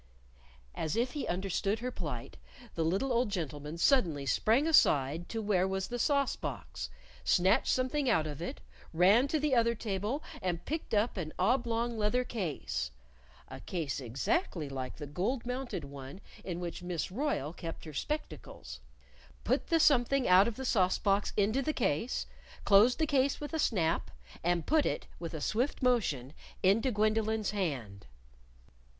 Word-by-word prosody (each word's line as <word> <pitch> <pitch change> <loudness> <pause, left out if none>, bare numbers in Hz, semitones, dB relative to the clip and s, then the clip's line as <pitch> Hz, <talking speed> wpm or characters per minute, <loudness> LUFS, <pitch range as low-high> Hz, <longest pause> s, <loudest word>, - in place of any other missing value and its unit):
As 155 -1 -2
if 240 +2 +1
he 295 - -4
understood 195 +3 -1
her 250 +3 -4
plight, - - -5 0.4
the 165 - -1
little 195 +11 0
old 240 -1 +2
gentleman 155 -4 -4
suddenly 170 - +3
sprang 225 - +3
aside 160 - +3
to 225 -1 -3
where 190 -3 +2
was 190 0 -2
the 245 0 -3
sauce 280 +1 +2
box, - - -6 0.3
snatched 190 +3 +3
something 260 +2 +1
out 160 -9 +3
of 150 0 -6
it, 175 - -5 0.3
ran 195 +10 +5
to 310 +2 0
the 295 -1 +1
other 235 -1 +3
table 215 +7 -2 0.2
and 175 -2 -2
picked 315 -6 -2
up 210 +1 +1
an 155 -4 -4
oblong 235 +2 +1
leather 215 +4 +2
case 180 - -3 0.6
(a - - -9
case 160 -7 -3
exactly 150 - -1
like 130 -2 -5
the 150 - -7
gold 200 - -2
mounted 250 - -3
one 140 +3 -9 0.2
in 175 -2 -4
which 175 0 -5
Miss 175 -1 -3
Royle 205 - -1
kept 165 -2 -7
her 155 - -8
spectacles), 300 - -5 0.6
put - - 0
the 330 -2 +3
something 275 -3 +4
out 185 +3 +7
of 235 - -3
the 265 - -5
sauce 185 -7 +3
box 200 0 +1
into 215 +6 +2
the 310 +3 -1
case, 230 - 0 0.4
closed 210 +5 +6
the 315 - +2
case 280 -2 +2
with 295 +2 -6
a 320 - -1
snap, 170 - +1 0.3
and 175 -1 +1
put 310 -1 +3
it, - - -2
with 165 -1 -5
a 155 - -5
swift 245 - -1
motion, 155 - +1 0.3
into 205 +7 +4
Gwendolyn's 215 0 +1
hand. 135 - -3
205 Hz, 160 wpm, -31 LUFS, 165-250 Hz, 0.6 s, out